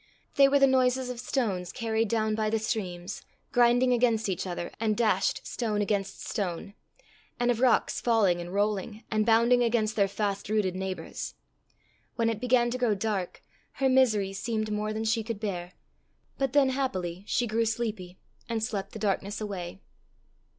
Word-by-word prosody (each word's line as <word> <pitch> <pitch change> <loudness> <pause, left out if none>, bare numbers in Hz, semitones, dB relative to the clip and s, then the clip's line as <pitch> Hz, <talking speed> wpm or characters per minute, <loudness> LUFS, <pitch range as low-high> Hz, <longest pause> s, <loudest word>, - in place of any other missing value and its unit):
They 275 -1 +6
were 280 +1 +4
the 275 - +6
noises 255 -1 +2
of 245 - -7
stones 210 -9 -1
carried 225 -2 -1
down 220 0 0
by 215 0 0
the 225 - +1
streams, 190 -4 -4 0.3
grinding 245 +1 +4
against 230 -3 +2
each 185 0 -2
other, 175 -1 -4
and 215 -2 0
dashed 210 -5 +1
stone 215 -4 -2
against 200 -1 -2
stone; 195 -1 -3 0.7
and 245 0 +3
of 235 - -1
rocks 250 -1 +2
falling 205 -7 +3
and 175 +1 -7
rolling, 205 +2 -1
and 215 0 +1
bounding 235 +2 +5
against 225 -2 +1
their 200 -2 +3
fast 200 0 -3
rooted 205 -4 +1
neighbours. 190 0 -5 0.8
When 230 -1 +1
it 220 - -5
began 245 -1 +3
to 255 - -3
grow 235 -4 +2
dark, 195 -3 -3 0.3
her 270 -1 +1
misery 220 -7 +3
seemed 215 +1 -2
more 210 0 -1
than 220 +1 -3
she 225 +1 +1
could 225 -2 -4
bear; 180 -4 -4 0.7
but 270 -1 0
then, 280 -2 +5
happily, 190 -10 -2
she 245 - +1
grew 225 0 0
sleepy, 215 -5 -3 0.3
and 225 -1 -1
slept 200 -3 -3
the - - -6
darkness 205 0 -1
away. 190 -3 -5
220 Hz, 170 wpm, -28 LUFS, 195-240 Hz, 0.8 s, They